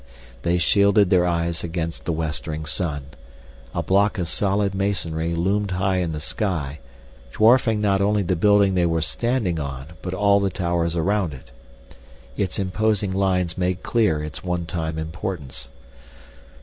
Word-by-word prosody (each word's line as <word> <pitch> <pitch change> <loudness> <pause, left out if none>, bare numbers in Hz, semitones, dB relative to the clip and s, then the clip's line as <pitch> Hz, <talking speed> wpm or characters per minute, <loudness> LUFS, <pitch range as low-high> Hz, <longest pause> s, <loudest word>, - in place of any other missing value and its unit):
They 85 +1 +1
shielded 100 +2 +4
their 90 -2 +4
eyes 85 -1 -1
against 85 -1 -4
the - - 0
westering 80 -1 -3
sun. 75 -2 -2 0.7
A - - 0
block 100 +3 +2
of 90 -3 -1
solid 100 +2 0
masonry 85 -5 -1
loomed 100 +4 0
high 95 0 0
in 90 -3 -1
the 75 - -4
sky, 80 -5 -2 0.5
dwarfing 115 - +4
not 100 -2 +2
only 105 +1 +2
the 90 0 0
building 100 +2 +4
they 90 -2 +2
were 80 -1 0
standing 115 -6 -1
on 70 +2 -6
but 90 +1 -4
all 100 +1 +4
the 100 -1 +1
towers 85 -2 -1
around 90 -2 0
it. 60 -1 -15 0.8
Its 95 -3 -1
imposing 100 +1 0
lines 95 -2 0
made 90 0 -1
clear 105 -11 +1
its 75 0 -6
one 90 -2 -2
time 80 -1 -3
importance. 80 -3 -5
90 Hz, 150 wpm, -23 LUFS, 80-100 Hz, 0.8 s, shielded